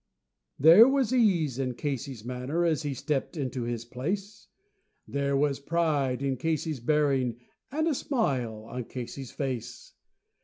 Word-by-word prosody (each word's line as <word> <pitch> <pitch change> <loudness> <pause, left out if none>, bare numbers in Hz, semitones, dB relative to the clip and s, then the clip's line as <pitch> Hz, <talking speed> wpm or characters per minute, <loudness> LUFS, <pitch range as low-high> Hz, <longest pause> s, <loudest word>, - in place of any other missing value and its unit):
There 170 - +9
was 270 -3 +2
ease 170 - +2
in 125 -2 -1
Casey's 135 -4 -4
manner 125 +7 -1
as 160 -3 +1
he 145 -3 -3
stepped 145 +4 -2
into 130 -3 -3
his 120 -1 -3
place, 190 - -4 0.6
There 140 0 0
was 140 -1 +1
pride 145 -4 0
in 135 -1 0
Casey's 155 0 -1
bearing, 135 -3 +1 0.3
and 315 +3 0
a 320 - +2
smile 130 - -1
on 125 0 -5
Casey's 125 +1 -7
face. 125 -4 -5
140 Hz, 140 wpm, -28 LUFS, 125-165 Hz, 0.6 s, There